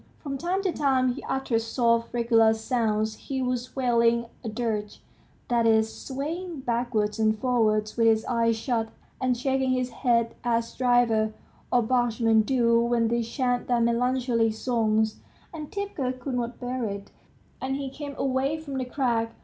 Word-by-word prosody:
From 280 Hz, -3 st, -5 dB
time 355 Hz, +7 st, -1 dB
to 380 Hz, -, +1 dB
time 260 Hz, -5 st, +2 dB
he 275 Hz, -, -8 dB
uttered 265 Hz, -4 st, 0 dB
soft 230 Hz, 0 st, +1 dB
regular 230 Hz, -2 st, +4 dB
sounds; 220 Hz, -2 st, 0 dB
he 270 Hz, -1 st, -4 dB
was 250 Hz, -1 st, -2 dB
wailing 235 Hz, -2 st, +2 dB, 0.2 s
a 225 Hz, -, -3 dB
dirge, 215 Hz, -2 st, -3 dB, 0.5 s
that 235 Hz, -1 st, +2 dB
is, 220 Hz, 0 st, +3 dB
swaying 310 Hz, +4 st, -5 dB
backwards 235 Hz, -3 st, -1 dB
and 215 Hz, 0 st, +2 dB
forwards 215 Hz, -3 st, +1 dB
with 230 Hz, -1 st, +4 dB
his 220 Hz, -1 st, +3 dB
eyes 230 Hz, -1 st, +1 dB
shut, 225 Hz, -1 st, -1 dB, 0.3 s
and 255 Hz, -1 st, +1 dB
shaking 265 Hz, +1 st, 0 dB
his 255 Hz, -1 st, -1 dB
head 235 Hz, -2 st, +1 dB
as 230 Hz, -1 st, 0 dB
drivers 240 Hz, -3 st, +2 dB, 0.4 s
or 245 Hz, -1 st, +4 dB
bargemen 230 Hz, -2 st, +2 dB
do 235 Hz, 0 st, +3 dB
when 235 Hz, -1 st, +1 dB
they 235 Hz, 0 st, +1 dB
chant 245 Hz, +1 st, -1 dB
their 245 Hz, -1 st, +2 dB
melancholy 235 Hz, 0 st, +2 dB
songs. 220 Hz, -1 st, 0 dB, 0.4 s
Antipka 315 Hz, -4 st, -3 dB
could 260 Hz, +1 st, -4 dB
not 240 Hz, -1 st, -3 dB
bear 250 Hz, 0 st, -3 dB
it, 200 Hz, -1 st, -6 dB, 0.5 s
and 265 Hz, +1 st, -1 dB
he 275 Hz, -1 st, -4 dB
came 285 Hz, 0 st, -7 dB
away 270 Hz, +3 st, 0 dB
from 285 Hz, -4 st, -5 dB
the 255 Hz, -, -2 dB
crack. 235 Hz, -4 st, -1 dB
240 Hz, 155 wpm, -26 LUFS, 225-260 Hz, 0.5 s, regular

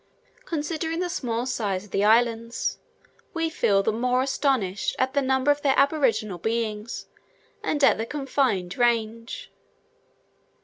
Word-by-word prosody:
Considering 325 Hz, +1 st, -2 dB
the 360 Hz, -1 st, -1 dB
small 240 Hz, -8 st, -2 dB
size 205 Hz, -6 st, -2 dB
of 205 Hz, -, -19 dB
the 195 Hz, -, +1 dB
islands, 230 Hz, +1 st, +2 dB, 0.6 s
we 330 Hz, -1 st, 0 dB
feel 195 Hz, -9 st, +2 dB
the 220 Hz, -, +2 dB
more 250 Hz, +3 st, +1 dB
astonished 265 Hz, -8 st, 0 dB
at 260 Hz, +1 st, 0 dB
the 280 Hz, -, +2 dB
number 265 Hz, +1 st, +2 dB
of 290 Hz, 0 st, 0 dB
their 275 Hz, -2 st, +2 dB
aboriginal 230 Hz, -, +2 dB
beings, 220 Hz, +1 st, -3 dB, 0.6 s
and 295 Hz, -1 st, -1 dB
at -, -, +6 dB
their 225 Hz, -, -3 dB
confined 260 Hz, -11 st, -1 dB
range. 230 Hz, -1 st, 0 dB
240 Hz, 135 wpm, -25 LUFS, 220-280 Hz, 0.6 s, at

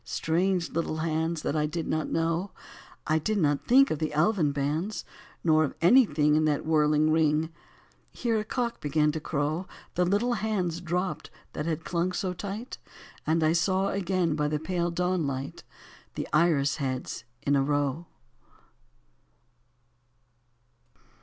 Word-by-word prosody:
Strange, 175 Hz, +2 st, 0 dB
little 165 Hz, -1 st, -2 dB
hands 160 Hz, 0 st, -1 dB
that 145 Hz, -, -1 dB
I 150 Hz, 0 st, +1 dB
did 160 Hz, +2 st, -4 dB
not 155 Hz, 0 st, -1 dB
know: 165 Hz, +4 st, 0 dB, 0.6 s
I 155 Hz, +1 st, +2 dB
did 215 Hz, +7 st, -1 dB
not 145 Hz, -6 st, +1 dB
think 270 Hz, +3 st, +6 dB
of 155 Hz, -, -1 dB
the 155 Hz, -, -1 dB
elvan 165 Hz, -2 st, +2 dB
bands, 150 Hz, +9 st, -2 dB, 0.4 s
Nor 155 Hz, -1 st, +4 dB
of 145 Hz, -, -3 dB
anything 165 Hz, -, +5 dB
In 155 Hz, +1 st, +3 dB
that 150 Hz, -2 st, 0 dB
whirling 155 Hz, -1 st, +3 dB
ring 155 Hz, 0 st, +2 dB, 0.2 s
— -, -, -30 dB
' -, -, -38 dB
Here 230 Hz, -3 st, +1 dB
a -, -, -2 dB
cock 235 Hz, +1 st, -2 dB
began 150 Hz, +1 st, +2 dB
to 160 Hz, -, -4 dB
crow 150 Hz, 0 st, -1 dB
1 185 Hz, -, -6 dB, 0.3 s
The 180 Hz, -, +2 dB
little 205 Hz, +7 st, +1 dB
hands 195 Hz, -7 st, -1 dB
dropped 175 Hz, -2 st, -2 dB, 0.2 s
that 150 Hz, -, -3 dB
had 165 Hz, 0 st, -2 dB
clung 175 Hz, +1 st, -1 dB
so 180 Hz, 0 st, -2 dB
tight, 205 Hz, +6 st, -6 dB, 0.5 s
And 160 Hz, +1 st, +2 dB
I 155 Hz, +1 st, +3 dB
saw 190 Hz, +3 st, +1 dB
again 185 Hz, -4 st, 0 dB
by 150 Hz, -1 st, 0 dB
the 150 Hz, 0 st, 0 dB
pale 175 Hz, +2 st, -1 dB
dawnlight 165 Hz, -7 st, -2 dB, 0.5 s
The -, -, -4 dB
iris 150 Hz, -3 st, +3 dB
heads 130 Hz, -3 st, -3 dB, 0.2 s
in 140 Hz, -, +2 dB
a 140 Hz, -, +3 dB
row. 145 Hz, +3 st, -1 dB
160 Hz, 155 wpm, -27 LUFS, 150-185 Hz, 0.6 s, think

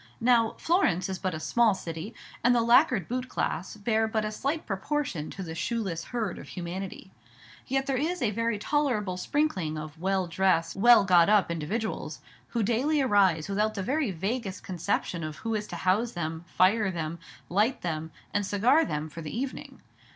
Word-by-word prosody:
Now, 230 Hz, -2 st, +3 dB
Florence 200 Hz, -, +1 dB
is 190 Hz, -1 st, -4 dB
but 185 Hz, -2 st, -2 dB
a -, -, -4 dB
small 230 Hz, +4 st, +3 dB
city, 170 Hz, +4 st, -6 dB, 0.3 s
and 245 Hz, +1 st, +5 dB
the 235 Hz, -, +3 dB
lacquered 235 Hz, -, +4 dB
boot 255 Hz, +1 st, -3 dB
class 185 Hz, +5 st, -2 dB
bear 220 Hz, +1 st, +1 dB
but 220 Hz, -1 st, -1 dB
a 215 Hz, -, -2 dB
slight 280 Hz, +8 st, -2 dB
proportion 195 Hz, -, -2 dB
to 195 Hz, -, -6 dB
the 165 Hz, -2 st, -6 dB
shoeless 170 Hz, 0 st, -2 dB
herd 225 Hz, -7 st, -3 dB
of -, -, -10 dB
humanity. 185 Hz, +2 st, -6 dB, 0.6 s
Yet 270 Hz, +1 st, 0 dB
there 270 Hz, -1 st, 0 dB
is 340 Hz, +6 st, -1 dB
a 235 Hz, -7 st, +1 dB
very 230 Hz, +1 st, 0 dB
tolerable 215 Hz, -6 st, 0 dB
sprinkling 185 Hz, -, -1 dB
of 155 Hz, +1 st, -8 dB
well 190 Hz, 0 st, +1 dB
dressed, 165 Hz, -2 st, +1 dB
well 235 Hz, +2 st, +7 dB
got 175 Hz, -1 st, +5 dB
up 205 Hz, -5 st, +4 dB
individuals, 185 Hz, +8 st, -3 dB, 0.3 s
who 235 Hz, -2 st, -1 dB
daily 255 Hz, +8 st, +1 dB
arise 195 Hz, -, +3 dB
without 210 Hz, +2 st, 0 dB
the 195 Hz, -, -2 dB
very 275 Hz, +3 st, 0 dB
vaguest 195 Hz, +3 st, -3 dB
conception 180 Hz, -1 st, -2 dB
of 155 Hz, -1 st, -5 dB
who 225 Hz, +5 st, -4 dB
is 210 Hz, -1 st, -2 dB
to -, -, -6 dB
house 210 Hz, +6 st, +1 dB
them, 165 Hz, -1 st, -4 dB
fire 195 Hz, +4 st, +3 dB
them, 165 Hz, -2 st, -4 dB, 0.3 s
light 210 Hz, +8 st, +1 dB
them, 160 Hz, -2 st, -3 dB, 0.2 s
and 205 Hz, -, +1 dB
cigar 225 Hz, +11 st, +3 dB
them 150 Hz, -, -3 dB
for 165 Hz, +2 st, -9 dB
the 155 Hz, +7 st, -5 dB
evening. 260 Hz, +1 st, -5 dB
205 Hz, 180 wpm, -28 LUFS, 175-235 Hz, 0.6 s, well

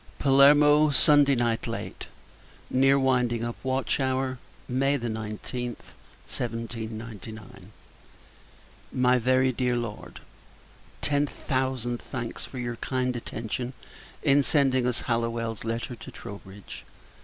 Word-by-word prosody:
Palermo, 145 Hz, +2 st, +6 dB
Sunday 145 Hz, 0 st, +5 dB
Night 120 Hz, -2 st, 0 dB
late, -, -, -5 dB, 0.6 s
near 135 Hz, +1 st, +4 dB
winding 125 Hz, -3 st, +1 dB
up 120 Hz, 0 st, -3 dB
watch 130 Hz, -1 st, 0 dB
hour, 130 Hz, -1 st, 0 dB, 0.3 s
May 135 Hz, +3 st, +1 dB
19th, 115 Hz, +1 st, -4 dB, 0.5 s
1799. 115 Hz, -2 st, -6 dB, 1.2 s
MY 125 Hz, 0 st, +3 dB
VERY 130 Hz, +2 st, +3 dB
DEAR 125 Hz, 0 st, 0 dB
LORD, 120 Hz, -3 st, -5 dB, 0.8 s
Ten 145 Hz, 0 st, +2 dB
thousand 130 Hz, -3 st, -2 dB
thanks 120 Hz, -4 st, -5 dB
for 130 Hz, -, -10 dB
your 120 Hz, -1 st, -3 dB
kind 125 Hz, 0 st, -1 dB
attention 120 Hz, +2 st, -4 dB, 0.5 s
in 145 Hz, -1 st, +5 dB
sending 135 Hz, -3 st, +3 dB
us 125 Hz, -, -1 dB
Hallowell's 115 Hz, -2 st, -2 dB
letter 115 Hz, +2 st, -3 dB
to -, -, -10 dB
Troubridge. 100 Hz, -1 st, -10 dB
125 Hz, 105 wpm, -27 LUFS, 115-135 Hz, 1.2 s, Palermo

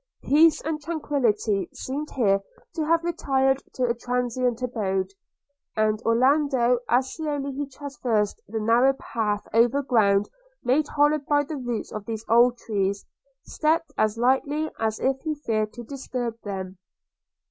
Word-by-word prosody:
Peace 310 Hz, +3 st, +5 dB
and 305 Hz, 0 st, -3 dB
tranquility 240 Hz, -, 0 dB
seemed 290 Hz, +4 st, -5 dB
here 200 Hz, -6 st, +3 dB, 0.3 s
to 315 Hz, -, -2 dB
have 330 Hz, +1 st, +3 dB
retired 270 Hz, -5 st, +1 dB
to 255 Hz, -, -1 dB
a 240 Hz, -1 st, +2 dB
transient 245 Hz, 0 st, -1 dB
abode; 195 Hz, -6 st, -1 dB, 0.6 s
and 215 Hz, 0 st, +1 dB
Orlando, 250 Hz, +1 st, +3 dB
as 255 Hz, +2 st, +2 dB
slowly 290 Hz, -3 st, -3 dB
he 280 Hz, +1 st, -4 dB
traversed 250 Hz, -7 st, -2 dB
the 220 Hz, +2 st, -3 dB
narrow 235 Hz, +5 st, +4 dB
path 215 Hz, -5 st, -3 dB
over 240 Hz, +5 st, +3 dB
ground 205 Hz, -6 st, +3 dB, 0.4 s
made 280 Hz, +4 st, +2 dB
hollow 295 Hz, +1 st, +3 dB
by 290 Hz, +1 st, +1 dB
the 300 Hz, +2 st, -6 dB
roots 245 Hz, -4 st, -4 dB
of 215 Hz, -1 st, -6 dB
these 225 Hz, -1 st, -5 dB
old 240 Hz, +2 st, +5 dB
trees, 200 Hz, -3 st, -2 dB, 0.4 s
stepped 315 Hz, -1 st, 0 dB
as 215 Hz, +1 st, +1 dB
lightly 280 Hz, +5 st, +1 dB
as 220 Hz, -1 st, -1 dB
if 265 Hz, 0 st, 0 dB
he 310 Hz, -2 st, -2 dB
feared 215 Hz, -7 st, -1 dB
to 240 Hz, -, -8 dB
disturb 245 Hz, -3 st, -5 dB
them. 190 Hz, -2 st, -6 dB
250 Hz, 145 wpm, -25 LUFS, 220-285 Hz, 0.6 s, Peace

